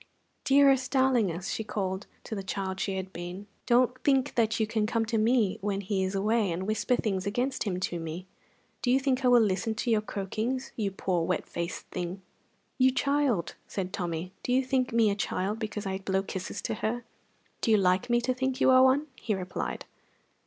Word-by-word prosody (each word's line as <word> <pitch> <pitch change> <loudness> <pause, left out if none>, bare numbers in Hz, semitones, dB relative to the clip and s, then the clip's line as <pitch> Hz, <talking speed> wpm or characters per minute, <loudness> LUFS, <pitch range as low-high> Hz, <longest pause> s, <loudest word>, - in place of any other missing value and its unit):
"Dearest, 275 -2 +5
darlingest," 235 - +2
she 220 - -2
called 195 -2 -3 0.2
to - - -7
the 200 - -3
child 190 0 -3
she 195 -1 -1
had 190 0 -5
been, 175 +3 -6 0.2
"don't 250 +1 +3
think 270 -1 +2
that 225 -1 +1
you 220 - +3
can 215 0 0
come 230 0 0
to 225 0 0
me 225 -3 +2
when 200 0 -1
he 195 -1 -1
is 190 +1 -2
away, 210 0 +2
and 180 +3 -3
whisper 215 +3 +1
things 195 -5 -1
against 245 +6 -1
him 185 -3 -1
to 175 -2 -2
me. 165 +2 -6 0.6
Do 245 - 0
you 260 +2 +5
think 265 -1 0
I - - +4
will 245 -2 +6
listen 205 +2 0
to 240 +2 -1
your 215 -1 +3
croakings, 220 +6 -3
you 210 -3 -1
poor, 185 -3 -1
wet - - -1
faced 170 +1 -5
thing!" 180 +2 -4 0.6
"You 260 0 +6
child!" 270 - +1
said 190 -1 -4
Tommy. 175 -1 -3
"Do - - -3
you 260 +1 +3
think 255 -1 +1
me 230 -2 +4
a - - -1
child 200 +1 -2
because 210 -2 -4
I 190 0 -2
blow 190 0 0
kisses 190 -1 -5
to - - -1
her?" 240 +2 -1 0.6
"Do - - 0
you 220 - +6
like 190 +5 +2
me 240 0 +3
to 255 +2 0
think 260 +1 -2
you - - +5
one?" 260 +3 +6
he 215 - -1
replied. 185 -1 -4
215 Hz, 200 wpm, -29 LUFS, 190-250 Hz, 0.6 s, will